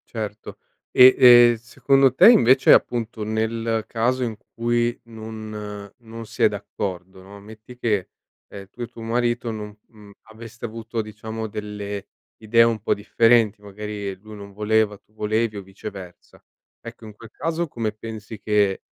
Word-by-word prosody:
Certo. 105 -1 -6 0.3
E 130 0 +8 0.4
e, - - -6
secondo 135 +3 +2
te, 135 - +8
invece, 130 - +5
appunto, 115 -2 +2
nel 110 +1 -2
caso 125 +3 -1
in 115 -4 -3 0.2
cui 120 0 0
non 110 -2 -8
non 115 -2 -10
si - - -3
è - - +8
d'accordo, 95 0 -6
no, 100 +2 -13
metti 110 +4 -14
che, 105 -6 -1 0.4
ehm, 100 -1 -11
tu 120 - -13
e - - -2
tuo 115 - -12
marito 120 +1 -1
non 105 -2 -7
mhmm, 105 -2 -17 0.2
aveste 115 +1 -10
avuto, 115 0 -5
diciamo, 110 +1 -7
delle 105 -1 -6 0.3
idee 115 +1 +3
un 115 -1 +3
po' 105 - 0
differenti, 115 0 +2
magari 105 0 -6
lui 105 +2 -13
non 100 -1 -11
voleva, 105 0 0
tu 105 - -37
volevi, 110 0 -1
o 100 - -7
viceversa. 95 -1 -11 0.4
Ecco, 115 -1 -11
in 105 - -11
quel 115 +1 -14
caso, 165 +4 -3
come 115 -6 -3
pensi 110 0 -9
che, 105 -2 +1
110 Hz, 155 wpm, -22 LUFS, 105-115 Hz, 0.4 s, E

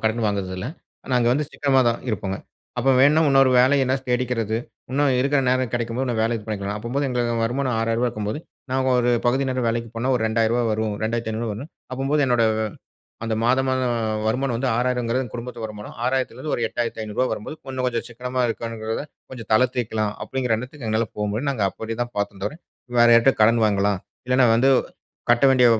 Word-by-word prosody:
கடன் 110 +1 +1
வாங்குறது 100 -2 -2
இல்ல. 95 - -4 0.5
நாங்க 120 -1 +3
வந்து 145 +2 0
சிக்கனமா 135 -2 +2
தான் 115 - -1
இருப்பங்க. 95 -2 -2 0.4
அப்ப 135 - +3
வேணா 145 +4 +6
இன்னொரு 135 -1 +5
வேலைய 135 +2 +5
எதுனா 130 +1 +1
தேடிக்கிறது. 120 -3 0 0.3
இன்னும் 140 -1 +2
இருக்கிற 140 +2 +2
நேரம் 130 -2 +1
கிடைக்கும்போது 120 +2 -1
இன்னும் 115 -3 -1
வேலைய 115 +1 +1
இது 105 - -12
பண்ணிக்கணும். 100 -1 -3
அப்பம்போது 130 +6 -2
எங்களுக்கு 120 -2 0
வருமானம் 130 +1 -1
6000 115 +2 +1
இருக்கும்போது, 110 +2 -3 0.3
நாங்க 130 0 +1
ஒரு 120 0 +2 0.2
பகுதி 135 +3 +2
நேரம் 130 -2 -1
வேலைக்கு 115 0 -2
போனா, 125 +3 0
ஒரு 110 - -2
2000 115 +2 +2
வரும். 110 -1 -1
2500 110 0 -2
வருனு 135 +8 -7 0.3
அப்பம்போது 135 +3 0
என்னோட 120 -2 +3 0.8
அந்த 115 -1 -1
மாத, 130 +2 +4
மாதம் 130 -2 +1 0.3
வருமானம் 125 +1 0
வந்து 130 +2 -1
6000 125 -1 0
குடும்பத்து 120 -1 -6
வருமானம். 105 -1 -7
6000 130 -1 0
இருந்து 150 +2 -4
ஒரு 120 - -3
8500 115 0 -2
வரும்போது 110 +8 -5 0.2
இன்னும் 130 -1 -1
கொஞ்சம் 120 -2 -1
சிக்கனமா 125 +2 -3
இருக்கணுங்கிறத 115 +1 -3 0.3
கொஞ்சம் 115 -5 -9
தளரத்திக்கலாம். 110 -3 +1
அப்பிடிங்கிற 125 -4 -1
எண்ணத்துக்கு 125 0 -8
எங்களால 110 +1 +1
போ 105 - -1
முடியும். 135 +7 -1
நாங்க 110 -6 -1
அப்பிடி 110 0 -6
தான் 120 - -6
பார்த்தோம் 100 -1 -3
தவிர, 125 - -3 0.5
வேறு 120 0 +7
யார்ட்ட 120 +3 +6
கடன் 115 +1 +4
வாங்கலாம். 100 -1 +2 0.3
இல்லன்னா 130 0 +4
வந்து 130 +4 +4 0.6
கட்ட 120 +2 +4
வேண்டிய 125 -2 +5
120 Hz, 180 wpm, -23 LUFS, 110-130 Hz, 0.8 s, வேறு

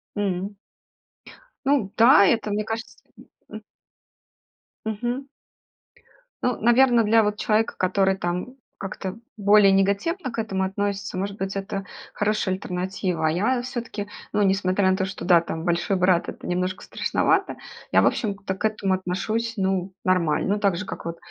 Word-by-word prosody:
М. 200 0 -2 1.1
Ну 270 -9 +2
да, 230 -3 +7
это, 215 0 +1
мне 210 +1 0
кажется 225 +2 -5 0.2
М - - -16 0.2
м. - - -8 1.2
Мгм. 240 +5 -3 1.2
Ну, 250 -2 +1
наверно, 240 0 +5
для 220 +1 +4
вот 210 0 -1
человека, 220 +1 +1
который 190 +1 +2
там 175 +1 -3 0.3
как-то 195 +1 -5 0.2
более 205 -1 +6
негативно 200 - +1
к - - -8
этому 195 -4 -1
относится, 200 0 -2
может 200 +2 -3
быть, 195 0 -3
это 195 0 -4 0.3
хорошая 210 -2 0
альтернатива. 180 -2 -3
А 155 - +2
я 225 +9 +1
всё-таки, 235 -5 -5 0.3
ну, 210 - +2
несмотря 190 0 +2
на 190 - +2
то, 190 - 0
что 190 +1 -6
да, 175 -2 +6
там 165 0 -5
"Большой 175 +3 +1
Брат"- 180 -1 +2
это - - -9
немножко 185 +1 -2
страшновато, - - 0 0.4
я, - - +5
в - - +4
общем-то, 200 -4 -2
к 205 - -3
этому 200 -3 -1
отношусь, 215 +5 -2
ну, 190 -1 -1
нормально. 180 0 +2
Ну, 210 - -3
так 200 -4 +1
же 185 - -4
как - - -7
вот 170 0 -4
195 Hz, 155 wpm, -24 LUFS, 185-215 Hz, 1.2 s, да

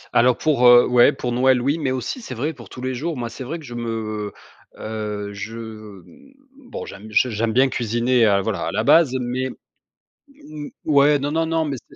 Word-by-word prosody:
Alors 125 +1 +4
pour, 135 -6 +3
heu, 120 0 +8
ouais, 125 -1 +5
pour 125 - -4
Noël, 130 +1 +3
oui, 140 +6 0
mais 140 -4 -1
aussi 130 - -4
c'est 130 - -7
vrai 145 +7 -2
pour 120 -8 -14
tous 125 - -10
les 130 0 -2
jours, 150 +5 -3
moi 120 -1 -4
c'est 120 +3 -8
vrai 150 +7 -5
que 160 - -12
je 120 - -9
me, 110 -3 -4 0.5
heu, 105 -2 -5
je, 105 +3 -7
mmh, 110 - -12 0.4
bon, - - -6
j'aime 105 - -10
j 125 +4 +2
j'aime 110 +1 -1
bien 130 +4 +4
cuisiner, 120 0 +1
heu, 100 -1 +3
voilà, - - -3
à - - -2
la - - -1
base, 160 -6 +5
mais 125 +1 -2 0.9
m 150 - -9 0.2
ouais, 145 0 +4
non, 145 +1 -3
non, 165 +1 0
non, 165 0 0
mais 140 -3 -3
c'est - - -17
125 Hz, 215 wpm, -21 LUFS, 115-145 Hz, 0.9 s, heu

